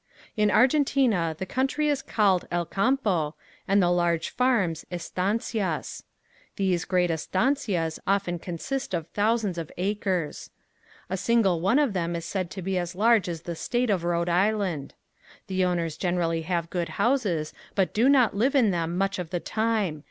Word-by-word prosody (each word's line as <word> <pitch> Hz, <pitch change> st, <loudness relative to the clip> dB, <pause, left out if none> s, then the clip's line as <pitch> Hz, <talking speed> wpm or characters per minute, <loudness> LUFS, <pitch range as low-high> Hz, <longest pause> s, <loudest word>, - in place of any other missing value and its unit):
In 210 Hz, -2 st, +3 dB
Argentina 250 Hz, -, +3 dB
the 190 Hz, -, -4 dB
country 270 Hz, +8 st, 0 dB
is 290 Hz, -2 st, +1 dB
called 195 Hz, -5 st, +1 dB
"Elcampo" 180 Hz, -, 0 dB, 0.3 s
and 195 Hz, +1 st, +4 dB
the 175 Hz, -, +3 dB
large 175 Hz, -2 st, +1 dB
farms 200 Hz, -11 st, +1 dB
"Estancias." 195 Hz, +4 st, -2 dB, 0.5 s
These 185 Hz, -3 st, 0 dB
great 180 Hz, -2 st, +1 dB
estancias 185 Hz, -, 0 dB
often 195 Hz, -3 st, 0 dB
consist 190 Hz, +7 st, -4 dB
of 165 Hz, -2 st, -4 dB
thousands 210 Hz, -4 st, 0 dB
of 160 Hz, -, -6 dB
acres. 185 Hz, -4 st, -2 dB, 0.6 s
A 190 Hz, -, -2 dB
single 195 Hz, -6 st, +2 dB
one 195 Hz, +9 st, +3 dB
of 290 Hz, -7 st, +2 dB
them 170 Hz, -2 st, -1 dB
is 170 Hz, -, -4 dB
said 185 Hz, -3 st, -3 dB
to 190 Hz, +1 st, -7 dB
be 190 Hz, 0 st, 0 dB
as 175 Hz, 0 st, -4 dB
large 215 Hz, -2 st, +3 dB
as 165 Hz, -1 st, -5 dB
the 170 Hz, -1 st, -5 dB
state 240 Hz, +6 st, 0 dB
of 185 Hz, -4 st, 0 dB
Rhode 170 Hz, 0 st, 0 dB
Island. 185 Hz, -4 st, 0 dB, 0.5 s
The 185 Hz, -1 st, 0 dB
owners 170 Hz, -3 st, -1 dB
generally 170 Hz, -2 st, 0 dB
have 170 Hz, 0 st, -2 dB
good 175 Hz, -2 st, -2 dB
houses 205 Hz, -, +1 dB, 0.2 s
but 190 Hz, -2 st, +1 dB
do 235 Hz, +5 st, +3 dB
not 255 Hz, -7 st, +4 dB
live 255 Hz, +8 st, +1 dB
in 235 Hz, -7 st, +4 dB
them 170 Hz, 0 st, -2 dB
much 195 Hz, 0 st, 0 dB
of 175 Hz, -3 st, -4 dB
the 175 Hz, -, -2 dB
time. 215 Hz, -7 st, -1 dB
185 Hz, 160 wpm, -26 LUFS, 170-220 Hz, 0.6 s, and